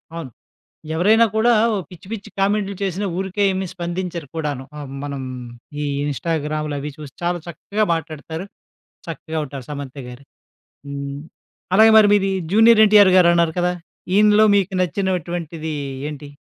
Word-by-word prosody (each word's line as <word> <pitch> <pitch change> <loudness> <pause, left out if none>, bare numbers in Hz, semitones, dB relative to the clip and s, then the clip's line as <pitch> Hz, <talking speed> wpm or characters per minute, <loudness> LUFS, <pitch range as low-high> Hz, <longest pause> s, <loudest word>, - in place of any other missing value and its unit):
అవును. 165 -6 -6 0.7
ఎవరైనా 215 +7 +5
కూడా 220 +2 +3 0.4
పిచ్చి 180 0 -14
పిచ్చి 205 -3 -6
కామెంట్లు 200 0 +1
చేసిన 195 +1 -2
ఊరికే 195 +1 -2
ఏమి 190 0 -2
స్పందించరు 175 -2 -4
కూడాను. 145 -4 -3
ఆ 150 - -6 0.2
మనం 140 -1 -5 0.6
ఈ - - -1 0.2
ఇన్‌స్టాగ్రాములవి 150 -1 -2
చూసి 150 -3 -10
చాలా 175 0 0
చక్కగా 200 +5 -2
మాట్లాడతారు. 160 +1 -6 0.6
చక్కగా 160 0 -5
ఉంటారు 135 -2 -8
'సమంత' 140 -1 -6
గారు. 125 +2 -11 0.6
హ్మ్. 140 0 -5 0.6
అలాగే 220 +2 +7
మరి 210 - +6
మీది 195 -1 +2 0.2
'జూనియర్ 225 +1 +7
ఎన్టీఆర్' 205 -3 +6
గారున్నారు 170 -2 +4
కదా! 180 0 +1 0.4
ఈయనిలో 210 +1 +5
మీకు 195 0 0
నచ్చినటువంటిది 175 -4 -2 0.3
ఏంటి? 145 -1 -8
170 Hz, 130 wpm, -21 LUFS, 150-195 Hz, 0.7 s, అలాగే